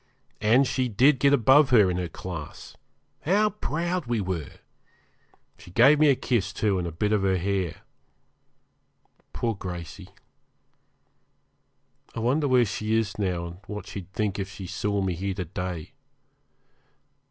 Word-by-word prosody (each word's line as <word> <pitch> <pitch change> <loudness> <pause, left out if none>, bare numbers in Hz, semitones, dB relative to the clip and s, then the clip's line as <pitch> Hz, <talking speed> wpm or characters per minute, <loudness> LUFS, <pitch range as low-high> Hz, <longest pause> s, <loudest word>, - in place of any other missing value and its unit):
And 115 +6 +4
she 130 -1 -1
did 130 +5 +4
get 140 +1 +4
above 135 +2 +5
her 105 -7 +5
in 90 - -2
her 90 -1 -2
class. 80 -2 -8 0.4
How 210 +6 +2
proud 175 - -3
we 120 -1 0
were! 90 -6 -4 1.1
She - - -14
gave 135 +10 +5
me 155 -1 +5
a 140 - +5
kiss, 110 -7 -1
too, 100 -1 0
and 85 - -3
a - - -4
bit 105 +6 -1
of 105 - +2
her 95 -1 +2
hair. 95 -2 -2 1.5
Poor 115 -1 -1
Gracey! 90 -4 -8 2.1
I - - -3
wonder 135 +6 +1
where 125 -2 +4
she 110 +2 -2
is 105 -3 -1
now, 90 -4 -1
and 85 0 -8
what 105 -1 -6
she'd 95 -2 -8
think 105 -1 -2
if 95 0 -3
she 95 0 -9
saw 100 +3 -2
me 95 -2 -1
here 95 +3 -3
to 90 -2 -4
day. 90 -1 -5
105 Hz, 155 wpm, -26 LUFS, 90-125 Hz, 2.1 s, above